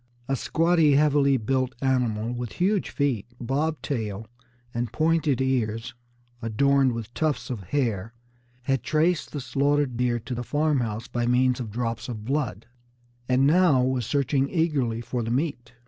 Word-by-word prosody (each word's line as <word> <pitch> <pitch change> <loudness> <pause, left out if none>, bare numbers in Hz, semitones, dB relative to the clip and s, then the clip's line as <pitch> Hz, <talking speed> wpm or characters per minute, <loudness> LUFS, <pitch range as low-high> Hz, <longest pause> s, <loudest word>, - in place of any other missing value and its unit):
A 135 - +1
squatty, 165 +2 +3
heavily 140 -2 +4
built 130 +2 -1
animal, 120 -4 0
with 120 -2 -5
huge 195 +2 +1
feet, 130 -8 -1
bob 145 +6 -1
tail, 110 -5 -3 0.5
and 120 -1 -2
pointed 160 -4 +1
ears 120 -3 -1 0.5
adorned 135 +3 +2
with 115 0 -6
tufts 150 -5 -1
of 105 -7 -5
hair, 115 -5 -1 0.5
had 135 -1 0
traced 160 +5 +1
the 145 - -4
slaughtered 140 0 0
deer 125 -1 +1
to 120 +3 -6
the 120 - -3
farmhouse 125 -6 0
by 120 -1 -2
means 125 +1 +3
of 120 -4 -4
drops 115 +2 -3
of 110 -3 -6
blood, 130 -7 -2 0.6
and 130 +1 +4
now 155 -4 +4
was 130 -3 0
searching 140 -1 +1
eagerly 140 -10 0
for 120 +1 -3
the 115 - -3
meat. 125 -2 -2
130 Hz, 150 wpm, -25 LUFS, 115-145 Hz, 0.6 s, heavily